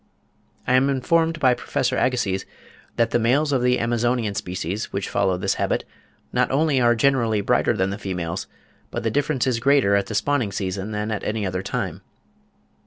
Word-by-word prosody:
I -, -, +1 dB
am 130 Hz, +2 st, +4 dB
informed 165 Hz, +4 st, +1 dB
by 130 Hz, -4 st, +4 dB
Professor 125 Hz, +1 st, -1 dB
Agassiz 120 Hz, -7 st, 0 dB, 0.5 s
that 115 Hz, -1 st, +1 dB
the 120 Hz, -, +2 dB
males 140 Hz, +6 st, +2 dB
of 135 Hz, -3 st, +2 dB
the 125 Hz, 0 st, +3 dB
Amazonian 120 Hz, -1 st, 0 dB
species 90 Hz, +2 st, -4 dB
which 100 Hz, -, -3 dB
follow 95 Hz, -1 st, +1 dB
this 95 Hz, +2 st, 0 dB
habit, -, -, 0 dB, 0.5 s
"not -, -, +2 dB
only 140 Hz, -1 st, +2 dB
are 120 Hz, 0 st, +4 dB
generally 115 Hz, -4 st, +2 dB
brighter -, -, +1 dB
than 95 Hz, +1 st, +1 dB
the 100 Hz, -, -5 dB
females, 90 Hz, -2 st, -4 dB, 0.4 s
but -, -, -4 dB
the 115 Hz, -, 0 dB
difference 145 Hz, 0 st, 0 dB
is 125 Hz, -3 st, 0 dB
greater 135 Hz, -6 st, +3 dB
at 100 Hz, -1 st, +1 dB
the 110 Hz, -, -5 dB
spawning 130 Hz, -4 st, +1 dB
season 95 Hz, +1 st, -3 dB
than 105 Hz, 0 st, -3 dB
at 105 Hz, -, -3 dB
any 105 Hz, -1 st, -2 dB
other 90 Hz, -1 st, -2 dB
time." -, -, -4 dB
115 Hz, 180 wpm, -23 LUFS, 100-130 Hz, 0.5 s, am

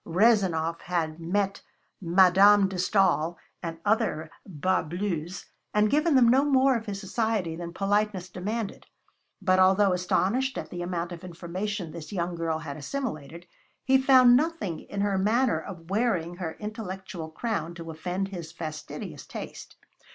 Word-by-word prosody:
Rezanov 175 Hz, -4 st, +2 dB
had 165 Hz, -3 st, -2 dB
met 195 Hz, +4 st, -1 dB, 0.4 s
Madame 190 Hz, +3 st, +6 dB
de 190 Hz, -1 st, -5 dB
Stael 180 Hz, -3 st, +2 dB, 0.2 s
and 165 Hz, -1 st, -5 dB
other 205 Hz, -8 st, 0 dB, 0.2 s
bas 185 Hz, +1 st, 0 dB
bleus, 175 Hz, -1 st, -3 dB, 0.3 s
and 210 Hz, +1 st, +3 dB
given 305 Hz, +1 st, +3 dB
them 250 Hz, -3 st, +6 dB
no 260 Hz, +4 st, +5 dB
more 270 Hz, -2 st, +4 dB
of 225 Hz, -1 st, -4 dB
his 200 Hz, -1 st, -4 dB
society 210 Hz, -4 st, -1 dB
than 170 Hz, 0 st, -6 dB
politeness 200 Hz, 0 st, 0 dB
demanded, 200 Hz, +4 st, -4 dB, 0.6 s
but 185 Hz, -1 st, +3 dB
although 190 Hz, +1 st, +5 dB
astonished 200 Hz, +9 st, 0 dB
at -, -, -6 dB
the 175 Hz, -, -5 dB
amount 175 Hz, 0 st, -3 dB
of 175 Hz, 0 st, -8 dB
information 180 Hz, +1 st, -4 dB
this 165 Hz, +2 st, -9 dB
young 175 Hz, -3 st, -2 dB
girl 165 Hz, -1 st, -1 dB
had 155 Hz, -3 st, -7 dB
assimilated, 165 Hz, -, -5 dB, 0.4 s
he 265 Hz, 0 st, +4 dB
found 255 Hz, -2 st, +7 dB
nothing 295 Hz, -, 0 dB
in 200 Hz, -, -5 dB
her 200 Hz, -1 st, +1 dB
manner 230 Hz, +6 st, +2 dB
of 175 Hz, -2 st, -10 dB
wearing 185 Hz, -6 st, 0 dB
her 170 Hz, -3 st, -4 dB
intellectual 190 Hz, -6 st, -6 dB
crown 170 Hz, -2 st, -3 dB
to 165 Hz, -1 st, -7 dB
offend 180 Hz, +5 st, -3 dB
his 175 Hz, -4 st, -7 dB
fastidious 155 Hz, -2 st, -7 dB
taste. -, -, -8 dB
185 Hz, 150 wpm, -27 LUFS, 170-215 Hz, 0.6 s, found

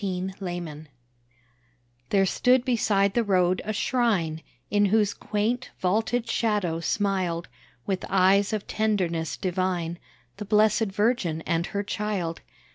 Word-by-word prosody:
THE 190 Hz, -1 st, -3 dB
PRAYER 175 Hz, -5 st, -6 dB, 1.2 s
There 195 Hz, -1 st, +3 dB
stood 250 Hz, +6 st, +3 dB
beside 205 Hz, -5 st, +2 dB
the 235 Hz, -, +2 dB
road 185 Hz, -3 st, +2 dB
a 215 Hz, -, -3 dB
shrine, 205 Hz, -9 st, 0 dB, 0.3 s
In 205 Hz, 0 st, +4 dB
whose 205 Hz, 0 st, +2 dB
quaint, 225 Hz, +4 st, -2 dB
vaulted 225 Hz, +5 st, 0 dB
shadow 205 Hz, -9 st, 0 dB
smiled 185 Hz, -2 st, -1 dB, 0.4 s
With 190 Hz, -2 st, -2 dB
eyes 195 Hz, +1 st, +4 dB
of 215 Hz, -2 st, -2 dB
tenderness 180 Hz, -7 st, -1 dB
divine, 180 Hz, -2 st, -2 dB, 0.4 s
The 210 Hz, -, -6 dB
Blessed 215 Hz, +1 st, +3 dB
Virgin 200 Hz, -5 st, 0 dB
and 165 Hz, +1 st, -1 dB
Her 200 Hz, 0 st, -2 dB
Child. 200 Hz, -5 st, -3 dB
195 Hz, 120 wpm, -26 LUFS, 175-215 Hz, 1.2 s, In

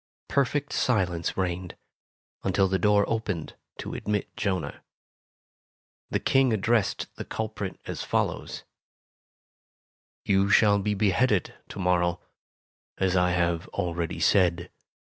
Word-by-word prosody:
Perfect 140 Hz, +1 st, 0 dB
silence 90 Hz, -8 st, 0 dB
reigned, 90 Hz, -1 st, -3 dB, 0.7 s
until 95 Hz, -1 st, +2 dB
the 95 Hz, 0 st, 0 dB
door 105 Hz, -1 st, +4 dB
opened 105 Hz, -8 st, -3 dB, 0.2 s
to -, -, -6 dB
admit 105 Hz, -1 st, -3 dB
Jonah. 95 Hz, -8 st, -2 dB, 1.3 s
The -, -, 0 dB
King 135 Hz, -2 st, +3 dB
addressed 110 Hz, 0 st, 0 dB
the -, -, -4 dB
culprit 110 Hz, -1 st, -4 dB
as -, -, -5 dB
follows: -, -, -2 dB, 1.6 s
"You 100 Hz, -1 st, +3 dB
shall 100 Hz, 0 st, +5 dB
be 105 Hz, +1 st, -1 dB
beheaded 105 Hz, +1 st, +2 dB, 0.2 s
to -, -, -9 dB
morrow, 90 Hz, -2 st, +1 dB, 0.8 s
as 95 Hz, -1 st, +1 dB
I 90 Hz, -1 st, +3 dB
have 85 Hz, -1 st, 0 dB
already 85 Hz, -1 st, -3 dB
said. 90 Hz, -2 st, +2 dB
95 Hz, 110 wpm, -27 LUFS, 90-105 Hz, 1.6 s, shall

